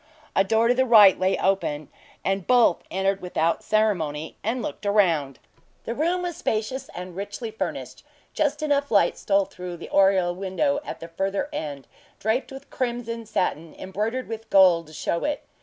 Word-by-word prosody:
A 195 Hz, -, +5 dB
door 225 Hz, +3 st, +2 dB
to -, -, +5 dB
the 260 Hz, +1 st, +2 dB
right 215 Hz, -6 st, +7 dB
lay 185 Hz, +1 st, +2 dB
open; 155 Hz, -7 st, 0 dB, 0.4 s
and 195 Hz, -1 st, -1 dB
both 245 Hz, -8 st, +4 dB
entered 195 Hz, +1 st, 0 dB
without 170 Hz, -2 st, 0 dB
ceremony, 165 Hz, -9 st, 0 dB
and 230 Hz, +4 st, -1 dB
looked 295 Hz, -, -6 dB
around. 170 Hz, -, +2 dB, 0.5 s
The 230 Hz, -, -3 dB
room 345 Hz, +7 st, 0 dB
was 350 Hz, -2 st, -3 dB
spacious, 240 Hz, -4 st, -2 dB
and 180 Hz, 0 st, -7 dB
richly 210 Hz, +4 st, -5 dB
furnished. 220 Hz, -, -5 dB, 0.3 s
Just 295 Hz, 0 st, 0 dB
enough 285 Hz, -1 st, +1 dB
light 205 Hz, -, +3 dB
stole 195 Hz, -1 st, +1 dB
through 180 Hz, -2 st, -8 dB
the -, -, -9 dB
oriel 190 Hz, -2 st, +4 dB
window 195 Hz, +11 st, -1 dB
at -, -, -7 dB
the 165 Hz, -, -7 dB
further 195 Hz, +9 st, -2 dB
end, 145 Hz, -, -5 dB, 0.3 s
draped 225 Hz, +6 st, -1 dB
with 270 Hz, 0 st, -11 dB
crimson 235 Hz, -2 st, -3 dB
satin 180 Hz, -6 st, -2 dB
embroidered 215 Hz, +7 st, -3 dB
with 225 Hz, 0 st, -7 dB
gold, 180 Hz, -4 st, +5 dB
to 155 Hz, -, -14 dB
show 170 Hz, +2 st, -2 dB
it. 295 Hz, 0 st, -2 dB
200 Hz, 170 wpm, -24 LUFS, 180-240 Hz, 0.5 s, right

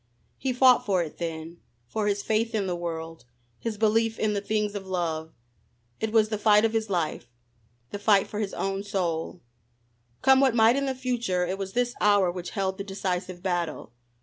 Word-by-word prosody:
He 265 Hz, -, -1 dB
fought 250 Hz, 0 st, +5 dB
for 190 Hz, -6 st, +1 dB
it 155 Hz, -, -9 dB
then: 165 Hz, 0 st, -5 dB, 0.3 s
for 210 Hz, -, -2 dB
his 205 Hz, 0 st, 0 dB
faith 225 Hz, +1 st, 0 dB
in 205 Hz, -2 st, 0 dB
the 180 Hz, -2 st, -1 dB
world, 165 Hz, -1 st, -5 dB, 0.4 s
his 225 Hz, -2 st, -4 dB
belief 225 Hz, +1 st, +2 dB
in 215 Hz, -1 st, 0 dB
the 200 Hz, -, -1 dB
things 210 Hz, 0 st, -1 dB
of 195 Hz, -2 st, -6 dB
love. 165 Hz, -3 st, -2 dB, 0.7 s
It 220 Hz, -, -2 dB
was 215 Hz, -1 st, +4 dB
the 215 Hz, -2 st, -2 dB
fight 210 Hz, 0 st, +5 dB
of 225 Hz, -, 0 dB
his 220 Hz, -1 st, -1 dB
life, 170 Hz, -9 st, -2 dB, 0.6 s
the 205 Hz, -, -5 dB
fight 205 Hz, -1 st, +4 dB
for 210 Hz, -, -6 dB
his 205 Hz, -2 st, -3 dB
own 195 Hz, 0 st, -2 dB
soul. 180 Hz, -4 st, -2 dB, 0.8 s
Come 265 Hz, 0 st, +6 dB
what 265 Hz, -3 st, +3 dB
might 225 Hz, +1 st, +5 dB
in 275 Hz, 0 st, 0 dB
the 265 Hz, -, -1 dB
future, 235 Hz, -8 st, -1 dB
it 190 Hz, +2 st, -3 dB
was 190 Hz, -1 st, -5 dB
this 245 Hz, 0 st, 0 dB
hour 205 Hz, -3 st, +4 dB
which 180 Hz, 0 st, -6 dB
held 190 Hz, -1 st, -2 dB
the -, -, -2 dB
decisive 185 Hz, -2 st, -4 dB
battle. 175 Hz, -8 st, -2 dB
200 Hz, 195 wpm, -26 LUFS, 180-220 Hz, 0.8 s, Come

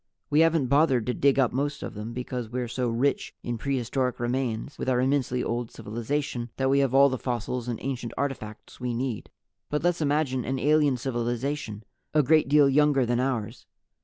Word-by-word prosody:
We 150 Hz, -, +4 dB
haven't 165 Hz, -3 st, +4 dB
bothered 135 Hz, -3 st, +3 dB
to 125 Hz, -, 0 dB
dig 140 Hz, +1 st, +3 dB
up 130 Hz, -4 st, +3 dB
most 145 Hz, +3 st, -2 dB
of -, -, -5 dB
them 110 Hz, +2 st, -6 dB
because 125 Hz, -1 st, -4 dB
we're 125 Hz, +1 st, -3 dB
so 125 Hz, +1 st, -1 dB
rich 125 Hz, +5 st, 0 dB
in 120 Hz, -1 st, -3 dB
prehistoric 130 Hz, -1 st, -1 dB
remains, 120 Hz, +1 st, -2 dB
with -, -, -1 dB
our 125 Hz, -1 st, +2 dB
immensely 130 Hz, -1 st, +1 dB
old 120 Hz, 0 st, -2 dB
civilization, 120 Hz, +3 st, -3 dB
that 135 Hz, 0 st, +1 dB
we 140 Hz, -, +4 dB
have 135 Hz, -2 st, +1 dB
all 140 Hz, +1 st, +7 dB
the 130 Hz, -2 st, -2 dB
fossils 120 Hz, 0 st, -3 dB
and 120 Hz, -2 st, -2 dB
ancient 125 Hz, -3 st, -3 dB
artifacts 125 Hz, -7 st, -5 dB
we 125 Hz, -1 st, -2 dB
need. 125 Hz, -3 st, -3 dB, 0.4 s
"But 150 Hz, +1 st, -1 dB
let's 175 Hz, -1 st, +1 dB
imagine 145 Hz, -4 st, +1 dB
an 130 Hz, +3 st, -2 dB
alien 145 Hz, 0 st, +3 dB
civilization 120 Hz, -2 st, -3 dB, 0.3 s
a 150 Hz, -, +5 dB
great 155 Hz, +1 st, +3 dB
deal 145 Hz, -1 st, +6 dB
younger 140 Hz, -1 st, +3 dB
than 120 Hz, 0 st, 0 dB
ours. 125 Hz, -5 st, -2 dB
130 Hz, 190 wpm, -26 LUFS, 120-140 Hz, 0.4 s, all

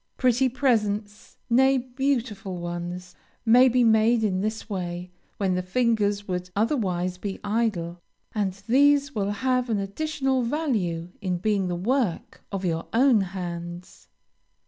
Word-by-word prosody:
Pretty 255 Hz, 0 st, +3 dB
presents 215 Hz, -5 st, -1 dB
nay, 265 Hz, +3 st, +4 dB
beautiful 245 Hz, -7 st, -2 dB
ones 175 Hz, +1 st, -5 dB, 0.3 s
may 250 Hz, +3 st, +7 dB
be 250 Hz, 0 st, +3 dB
made 225 Hz, +1 st, +4 dB
in 190 Hz, -3 st, 0 dB
this 215 Hz, +2 st, -3 dB
way, 180 Hz, -3 st, -4 dB, 0.3 s
when 195 Hz, -2 st, +1 dB
the 180 Hz, -, 0 dB
fingers 205 Hz, 0 st, 0 dB
would 180 Hz, -1 st, -3 dB
otherwise 185 Hz, -6 st, 0 dB
be 195 Hz, 0 st, -5 dB
idle, 205 Hz, -6 st, -1 dB, 0.3 s
and 200 Hz, -3 st, 0 dB
these 285 Hz, +3 st, +4 dB
will 200 Hz, -3 st, -1 dB
have 250 Hz, +3 st, 0 dB
an 220 Hz, -, +1 dB
additional 265 Hz, +6 st, -1 dB
value 225 Hz, -, -1 dB
in 185 Hz, -3 st, -1 dB
being 195 Hz, 0 st, 0 dB
the 175 Hz, -, -2 dB
work 215 Hz, 0 st, -1 dB
of 195 Hz, -2 st, -3 dB
your 165 Hz, -2 st, -1 dB
own 240 Hz, -2 st, +5 dB
hands. 175 Hz, -2 st, -6 dB
210 Hz, 135 wpm, -25 LUFS, 180-250 Hz, 0.3 s, may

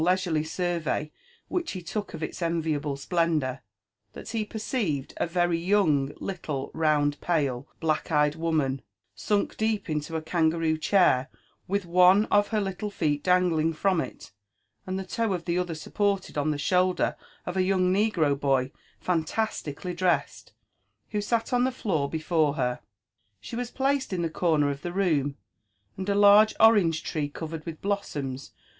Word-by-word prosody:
leisurely 175 Hz, -3 st, +1 dB
survey 160 Hz, -3 st, -2 dB, 0.4 s
which 350 Hz, -3 st, -2 dB
he 185 Hz, -, -5 dB
Mk 205 Hz, +1 st, -4 dB
of 160 Hz, -, -6 dB
its 155 Hz, -, -5 dB
enviable 155 Hz, -4 st, -1 dB
splendour, 155 Hz, -4 st, 0 dB, 0.5 s
that -, -, -9 dB
he 225 Hz, -2 st, -1 dB
perceived 210 Hz, -, -3 dB
a -, -, 0 dB
very 175 Hz, 0 st, +1 dB
young, 165 Hz, -7 st, +2 dB
little, 155 Hz, -8 st, -4 dB
round, 150 Hz, -2 st, +1 dB
pale, 140 Hz, -6 st, 0 dB
black 155 Hz, 0 st, -1 dB
eyed 150 Hz, -1 st, +3 dB
woman 155 Hz, -5 st, 0 dB, 0.3 s
sunk 205 Hz, -1 st, -1 dB
deep 220 Hz, -5 st, -1 dB
into 150 Hz, +2 st, -3 dB
a 160 Hz, -, -1 dB
kangaroo 160 Hz, -1 st, +1 dB
chair 155 Hz, -5 st, +3 dB, 0.4 s
with 200 Hz, 0 st, -1 dB
one 180 Hz, +4 st, +5 dB
or 205 Hz, -, +6 dB
her 215 Hz, +1 st, -2 dB
little 195 Hz, +1 st, -3 dB
feet 150 Hz, -7 st, -1 dB
dangling 175 Hz, -3 st, +2 dB
from 185 Hz, +1 st, +1 dB
it, -, -, -8 dB, 0.6 s
and 185 Hz, 0 st, -2 dB
the 190 Hz, -, -4 dB
toe 225 Hz, +2 st, -1 dB
of 175 Hz, -2 st, -4 dB
the 175 Hz, 0 st, 0 dB
other 175 Hz, -2 st, -2 dB
supported 200 Hz, +4 st, -1 dB
on 145 Hz, +1 st, 0 dB
tlie 145 Hz, -, -3 dB
shoulder 180 Hz, +4 st, +2 dB, 0.3 s
of 180 Hz, -, -4 dB
a 190 Hz, -, +2 dB
young 185 Hz, -1 st, +2 dB
oegro*boy 145 Hz, -10 st, +1 dB, 0.3 s
fantastically 180 Hz, -1 st, -2 dB
dressed, 180 Hz, +1 st, -1 dB, 0.6 s
who 210 Hz, -, -1 dB
sat 230 Hz, +3 st, -1 dB
on 245 Hz, 0 st, +3 dB
tlie 260 Hz, 0 st, +1 dB
floor 160 Hz, -, -1 dB
before 155 Hz, -2 st, +1 dB
her. 125 Hz, -2 st, -1 dB, 0.6 s
She -, -, -8 dB
was 245 Hz, 0 st, -3 dB
placed 275 Hz, 0 st, 0 dB
in 180 Hz, -2 st, -1 dB
the 165 Hz, -, -2 dB
corner 155 Hz, -4 st, +2 dB
of 140 Hz, 0 st, -6 dB
the 175 Hz, -, -4 dB
room, 150 Hz, -8 st, +1 dB, 0.6 s
and 190 Hz, +1 st, -4 dB
a 200 Hz, -, +2 dB
large 205 Hz, +1 st, +6 dB
orange 200 Hz, -8 st, +5 dB
tree, 150 Hz, -2 st, -2 dB
covered 160 Hz, +1 st, -7 dB
with 160 Hz, -2 st, -7 dB
blossoms 145 Hz, -10 st, -3 dB
170 Hz, 160 wpm, -27 LUFS, 150-195 Hz, 0.6 s, or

